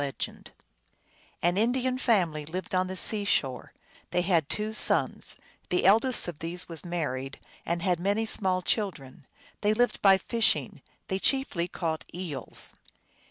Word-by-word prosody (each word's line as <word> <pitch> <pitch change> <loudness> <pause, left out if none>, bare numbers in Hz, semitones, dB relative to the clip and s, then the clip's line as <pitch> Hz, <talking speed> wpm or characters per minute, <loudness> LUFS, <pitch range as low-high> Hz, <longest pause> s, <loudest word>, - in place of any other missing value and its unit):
(Micmac.) 140 -1 -5 0.9
An 175 +2 +2
Indian 255 +3 +1
family 175 - +2
lived 175 +5 -6
on 185 0 +2
the 185 0 -5
sea 210 +1 +2
shore. 135 -10 0 0.4
They 180 - +1
had 170 -5 +2
two 215 +1 -1
sons; - - +2 0.3
the 180 - +1
eldest 225 +5 +4
of 170 -3 -6
these 170 +2 -2
was 165 -3 -4
married, 140 -6 -3 0.3
and 170 0 -1
had 180 -3 +1
many 200 +5 +1
small 185 -4 +1
children. 155 - -2 0.3
They 210 +1 +2
lived 245 -1 +1
by 195 -1 +7
fishing; 230 +4 0 0.3
they 190 -1 -1
chiefly 250 -9 +1
caught 160 -3 -3
eels. 170 -7 -4
185 Hz, 145 wpm, -28 LUFS, 165-215 Hz, 0.9 s, by